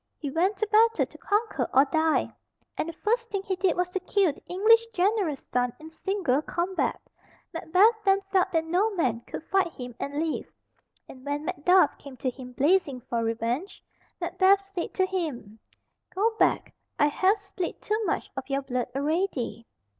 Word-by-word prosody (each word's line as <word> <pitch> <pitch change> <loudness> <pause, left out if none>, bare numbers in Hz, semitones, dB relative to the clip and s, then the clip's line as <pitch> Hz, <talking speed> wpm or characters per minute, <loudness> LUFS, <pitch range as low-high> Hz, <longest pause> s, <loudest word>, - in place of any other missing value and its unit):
He 285 -3 -5
went 370 +7 +1
to 435 - 0
battle 450 +2 +4
to - - -16
conquer 430 +2 0
or 270 +2 +6
die, 315 +2 +1 0.4
and 320 - -2
the - - -6
first 460 +7 -1
thing 395 -2 -3
he 385 -2 -2
did 360 -1 +1
was 360 0 +1
to 380 - -2
kill 370 -3 +1
the - - -19
English 435 +5 +5
general's 370 -6 0
son 245 -1 +1
in 315 +1 -11
single 330 -6 0
combat. 350 +4 -1 0.5
Macbeth 380 +7 +3
then 390 -1 +4
felt 375 -1 +2
that 325 -2 +1
no 360 +7 +2
man 245 -9 0
could - - -6
fight 380 -1 +1
him 245 -1 -8
and 280 - -4
live, 315 +1 -2 0.6
and 260 -1 -13
when 290 +2 -3
Macduff 360 -1 +3
came 275 -2 -11
to 255 - -1
him 250 0 -11
blazing 285 -2 +2
for 230 0 -2
revenge, 230 - -2 0.4
Macbeth 390 +1 +3
said 350 - -3
to 375 - +3
him, 295 - -4 0.6
"Go 445 +4 +1
back; - - +2 0.2
I 290 - +4
have 375 +8 +2
spilt 390 -3 -5
too 430 +1 -1
much - - -2
of 265 0 -6
your 275 0 -1
blood 250 -2 -2
already." 280 - -1
340 Hz, 175 wpm, -27 LUFS, 275-390 Hz, 0.6 s, or